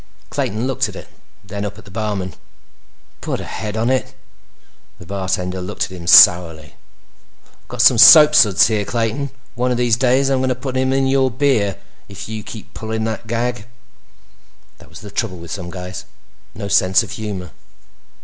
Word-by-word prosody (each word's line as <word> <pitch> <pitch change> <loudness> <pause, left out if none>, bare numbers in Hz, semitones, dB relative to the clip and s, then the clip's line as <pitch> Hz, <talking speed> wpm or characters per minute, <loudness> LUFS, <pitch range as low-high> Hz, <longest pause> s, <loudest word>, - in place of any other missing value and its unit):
Clayton 110 +4 -2
looked 130 -1 -1
at - - -11
it, - - -11 0.3
then 100 0 -6
up 100 0 -6
at 110 - -15
the 100 - -14
barman. 100 -3 -4 0.9
"Put - - -4
a - - -6
head 105 0 -6
on 115 +3 0
it." 130 - -2 0.8
The 90 - -14
bartender 95 -1 -3
looked 90 - -4
at - - -5
him 85 -2 -9
sourly. 85 -3 +5 0.7
"I've - - -32
got 125 -1 -1
some 120 -2 +5
soapsuds 150 - +7
here, 110 -2 0
Clayton, 115 +4 -2
and 140 0 -3 0.2
one 125 +1 -1
of 125 - -1
these 120 -2 +2
days 130 +2 +1
I'm 130 -1 +1
gonna 130 -1 0
put 130 +1 -6
some 130 0 0
in 135 0 +1
your 135 0 +2
beer 115 -7 0 0.3
if 100 - -9
you 110 0 -6
keep 110 0 -11
pulling 110 0 -4
that 110 0 -5
gag." 120 -1 -3 1.1
That - - -17
was - - -13
the - - -11
trouble 90 - -3
with 85 0 -11
some 95 -3 -6
guys. 90 0 -8 0.5
No 100 +1 -6
sense 95 +2 +3
of 110 - -9
humor. 100 -5 -6
110 Hz, 180 wpm, -18 LUFS, 95-125 Hz, 1.1 s, soapsuds